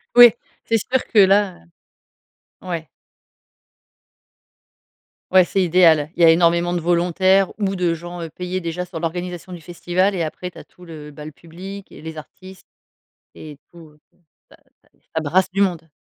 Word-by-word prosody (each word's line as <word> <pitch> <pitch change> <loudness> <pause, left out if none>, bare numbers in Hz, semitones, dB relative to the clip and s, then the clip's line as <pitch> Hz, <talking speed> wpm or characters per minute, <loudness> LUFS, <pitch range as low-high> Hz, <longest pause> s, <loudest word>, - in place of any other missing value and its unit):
Oui, 245 -1 +9 0.3
c'est 230 - +2
sûr 255 +4 -2
que 220 - +2
là, 195 0 +4 0.9
heu, - - -19
ouais. 165 -3 -4 2.5
Ouais, 185 -1 +7
c'est 195 - -1
idéal. 165 -4 +4
Il 175 - -1
y - - +8
a 165 - +8
énormément 170 +1 +2
de 175 - -1
volontaires 180 +3 +2
ou 195 -2 -1
de 180 -3 0
gens, 175 +1 -9
heu, 165 - -6
payé 180 +3 -5
déjà 170 +1 -4
sur 175 -2 -8
l'organisation 175 +2 -5
du 175 - -8
festival 175 +4 -1
et 175 - -1
après, 180 +3 -6
tu - - -15
as - - -11
tout 180 - -19
le, 155 -3 -10
heu, - - -10
bah, 150 +1 -11
le 155 - -9
public 180 +7 -11
et - - -13
les 160 0 -8
artistes 185 +5 -13 0.7
et 150 -2 -11 0.2
tout. 160 -3 -16 0.5
Ça - - -18 0.3
ça - - -31 0.3
ça 160 - 0
brasse 175 +5 +1
du 195 +2 -1
monde. 170 -4 -1
175 Hz, 175 wpm, -20 LUFS, 165-185 Hz, 2.5 s, Oui